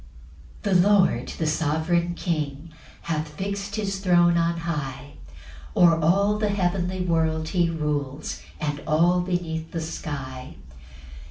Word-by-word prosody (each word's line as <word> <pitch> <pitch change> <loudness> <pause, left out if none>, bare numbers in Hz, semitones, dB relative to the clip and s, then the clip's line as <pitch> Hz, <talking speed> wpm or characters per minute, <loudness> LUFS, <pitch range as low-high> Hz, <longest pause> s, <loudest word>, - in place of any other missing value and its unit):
1 190 -3 +4
The 200 - +3
lord, 200 -3 +3
the 160 - -1
sovereign 160 +3 0
King, 155 -3 -3 0.3
Hath 155 -1 -2
fix'd 200 +2 -4
his 195 -3 -2
throne 175 -2 +4
on 170 0 +1
high; 145 -4 -4 0.6
O'er 165 -2 +6
all 200 +6 +3
the 210 -1 +1
heavenly 185 -1 0
world 160 -2 0
he 175 -3 +2
rules, 150 -3 -3 0.2
And 145 -1 -2
all 170 +3 +3
beneath 170 -3 -3
the 165 - -4
sky. 135 -5 -6
170 Hz, 125 wpm, -25 LUFS, 155-180 Hz, 0.6 s, O'er